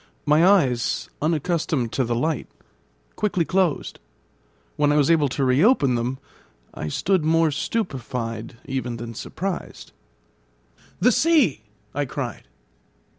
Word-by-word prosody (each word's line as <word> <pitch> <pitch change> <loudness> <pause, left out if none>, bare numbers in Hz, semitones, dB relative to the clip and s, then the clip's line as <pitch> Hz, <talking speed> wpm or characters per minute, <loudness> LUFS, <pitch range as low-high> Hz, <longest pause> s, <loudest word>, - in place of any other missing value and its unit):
My 150 +3 +4
eyes, 155 -11 +2
unaccustomed 155 -5 0
to 130 - 0
the 120 -1 -1
light, 155 +6 -1 0.7
quickly 190 -5 0
closed. 185 -4 0 0.8
When 145 0 +2
I - - +2
was 150 +1 +4
able 155 -3 +4
to 135 +1 -1
reopen 140 - +4
them, 120 +2 -1 0.6
I 75 - -5
stood 180 - +1
more 160 0 +3
stupefied 125 - -3
even 130 -3 -3
than 115 0 -7
surprised. 185 - -5 1.1
"The 250 - +5
sea!" 290 - +3 0.3
I 145 +1 -1
cried. 135 -2 -5
145 Hz, 120 wpm, -23 LUFS, 125-170 Hz, 1.1 s, The